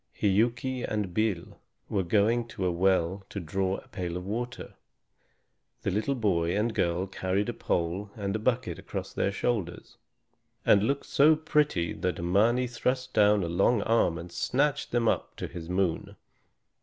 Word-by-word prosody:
Hiuki 120 +5 +1
and 105 -4 -2
Bil 105 -5 -1 0.3
were 100 - 0
going 110 +6 +2
to 95 -4 -4
a 90 - +2
well 95 +1 +1
to 100 - -5
draw 95 +3 -1
a - - -13
pail 90 -2 -4
of 90 - -6
water. 120 +5 -4 1.1
The - - 0
little 110 +8 0
boy 90 -6 +1
and 110 +2 0
girl 85 0 0
carried 95 +2 -1
a - - -2
pole 95 -2 -2
and 100 -1 -3
a - - -1
bucket 110 -7 -1
across 95 0 -6
their 100 - 0
shoulders, 100 -4 -3 0.7
and 100 - +6
looked 140 +6 0
so 150 +3 +5
pretty 150 - +1
that 90 - -2
Mâni 110 +9 +2
thrust 130 +1 -2
down 105 -1 +4
a - - -2
long 100 +6 +2
arm 110 -7 +2
and 85 +1 -8
snatched 145 +3 0
them 120 -1 +1
up - - 0
to - - -5
his 85 -1 -8
moon. 90 -2 -1
100 Hz, 165 wpm, -28 LUFS, 90-120 Hz, 1.1 s, and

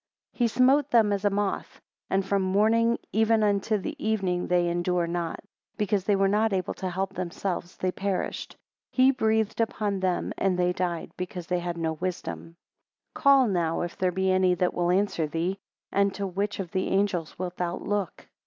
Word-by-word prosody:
7 - - -26
He - - +5
smote 260 +5 +3
them 220 -4 +4
as 200 0 -2
a - - +5
moth: 200 0 -2 0.3
and 190 0 +1
from 195 0 +1
morning 220 +5 +3 0.2
even 220 0 +3
unto 205 +1 +2
the 195 - -5
evening 190 -5 0
they 175 -1 +2
endure 175 0 0
not. 170 -1 -3 0.4
Because 205 -3 0
they 205 - +3
were 195 0 +3
not 210 +2 +2
able 185 -2 -1
to 185 - -4
help 190 +2 -2
themselves, 180 0 -4
they 185 - 0
perished; 195 0 -3 0.3
he 260 +1 +5
breathed 220 -3 +1
upon 210 -3 -1
them 185 -1 -1
and 190 -2 +1
they 180 0 +2
died, 175 -2 -3
because 180 -1 -5
they 180 +1 0
had 175 -1 -4
no 160 -1 -1
wisdom. 170 0 -5 0.6
8 - - -55
Call 275 -3 +5
now 170 -5 0
if 175 - -4
there 185 -1 +1
be 190 +1 +1
any 185 -1 +3
that 180 0 0
will 175 0 0
answer 180 -4 +1
thee; 170 +5 -2 0.3
and 200 0 +2
to 200 - -3
which 200 +3 -2
of 180 -4 -4
the 185 - -1
angels 190 -5 0
wilt 180 0 -5
thou 175 0 -1
look? 205 -3 -3
190 Hz, 190 wpm, -27 LUFS, 180-205 Hz, 0.6 s, He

